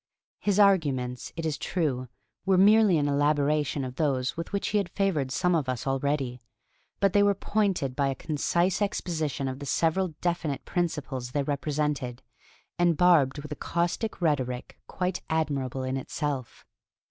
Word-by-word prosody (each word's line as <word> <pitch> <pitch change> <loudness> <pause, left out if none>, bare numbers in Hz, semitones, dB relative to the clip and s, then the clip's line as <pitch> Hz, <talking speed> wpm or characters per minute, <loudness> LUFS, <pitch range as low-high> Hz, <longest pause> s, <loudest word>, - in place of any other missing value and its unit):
His 205 -2 +1
arguments, 140 -11 +2
it 165 -1 -4
is 155 -2 -2
true, 135 -8 -1 0.4
were 190 -1 +3
merely 205 -1 +6
an 145 -1 +1
elaboration 145 0 +1
of 125 0 -7
those 135 -3 0
with 165 0 -5
which 200 - -1
he 210 - +2
had 195 - -2
favored 175 -9 0
some 180 +5 +1
of 150 -6 0
us 125 -3 -3
already; 135 -2 -1 0.6
but 195 -1 +3
they 205 - +5
were 205 0 +4
pointed 195 -11 0
by 140 0 +1
a 135 - -1
concise 170 +7 0
exposition 155 -8 -1
of 130 0 -4
the 145 - -6
several 165 +3 +1
definite 170 -6 -2
principles 140 -8 -2
they 145 - +1
represented, 145 -3 -2 0.6
and 175 -3 +3
barbed 160 -6 +4
with 150 - -9
a - - -2
caustic 175 +9 -2
rhetoric 130 -6 -1
quite 180 0 -2
admirable 140 -5 -1
in 130 +1 -1
itself. 135 -1 -4
150 Hz, 160 wpm, -27 LUFS, 135-175 Hz, 0.6 s, merely